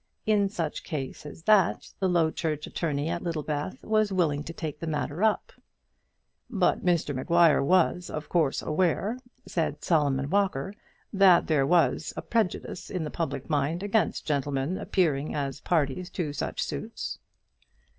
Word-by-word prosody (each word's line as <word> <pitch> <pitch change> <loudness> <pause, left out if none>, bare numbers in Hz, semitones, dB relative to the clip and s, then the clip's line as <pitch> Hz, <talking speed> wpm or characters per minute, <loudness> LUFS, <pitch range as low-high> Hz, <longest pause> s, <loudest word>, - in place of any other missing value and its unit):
In 205 -2 +3
such 170 -7 -3
case 150 -2 -5
as 160 - -11
that 195 -2 +3
the 190 - +1
Low 165 -3 +3
Church 155 -2 -2
attorney 150 -3 -2
at 170 - -2
Littlebath 155 -1 -3
was 215 -1 +2
willing 155 -6 +1
to - - -5
take 155 -3 -5
the 165 - -5
matter 150 +3 -2
up. 220 -1 +1 1.0
"But 200 -7 +1
Mr 170 -5 +1
Maguire 165 +4 +4
was, 180 +3 +2
of 155 0 -5
course, 160 -6 +1
aware," 185 +8 0 0.3
said 160 -4 -2
Solomon 145 -4 +1
Walker, 195 -4 +1 0.4
"that 190 -3 +6
there 145 -4 +2
was 165 -1 +2
a - - -4
prejudice 215 -6 -2
in 180 -4 -2
the 150 - -4
public 145 -5 -3
mind 155 +4 0
against 205 -3 0
gentlemen 145 +2 -1
appearing 155 -7 0
as 140 -1 -3
parties 170 +2 0
to 155 -6 -3
such - - -2
suits." - - -5
165 Hz, 150 wpm, -27 LUFS, 145-185 Hz, 1.0 s, that